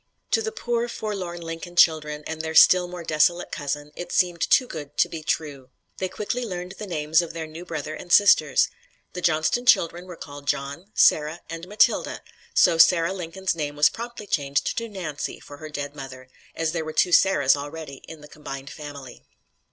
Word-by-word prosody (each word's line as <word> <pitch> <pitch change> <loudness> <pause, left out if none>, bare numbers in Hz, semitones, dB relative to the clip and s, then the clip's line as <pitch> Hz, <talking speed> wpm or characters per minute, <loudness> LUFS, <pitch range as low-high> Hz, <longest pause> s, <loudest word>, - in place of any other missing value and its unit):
To 450 - +3
the 445 0 -3
poor 240 - -2
forlorn 195 -7 -5
Lincoln 165 +1 -7
children 150 -3 +3
and 160 0 -4
their 160 0 -5
still 180 +1 +7
more 175 -1 -8
desolate 165 +3 +1
cousin, 145 0 -4
it 175 0 -7
seemed 175 -2 +1
too 255 - +4
good 150 -9 -8
to - - +4
be 165 - -7
true. 145 -4 -3 0.3
They 185 - -2
quickly 235 +6 -3
learned 180 -4 -5
the 210 - -6
names 160 -1 +2
of 170 - -6
their 165 -1 -5
new 160 +3 -10
brother 155 -3 -5
and 175 +3 -9
sisters. 205 +2 +5 0.5
The 180 - -5
Johnston 165 +10 +1
children 175 -3 +3
were 180 - -8
called 145 -2 -10
John, 140 +7 -2
Sarah 155 +3 +3
and 165 +1 -7
Matilda, 210 +2 +1 0.3
so 165 - +4
Sarah 165 +1 +5
Lincoln's 190 +1 -3
name 150 -3 -4
was 150 +1 +5
promptly 235 -2 -8
changed 140 -6 -1
to 230 0 -3
Nancy 175 -8 -5
for 145 - -12
her 155 +1 -9
dead 145 -1 -5
mother, 130 -2 -9 0.3
as 165 -1 -1
there 165 -1 -2
were 155 0 -6
two 180 - +2
Sarahs 145 -8 +5
already 145 0 -7
in 160 -2 -10
the 150 - -12
combined 140 -1 -8
family. 145 -4 -9
165 Hz, 190 wpm, -24 LUFS, 150-180 Hz, 0.5 s, still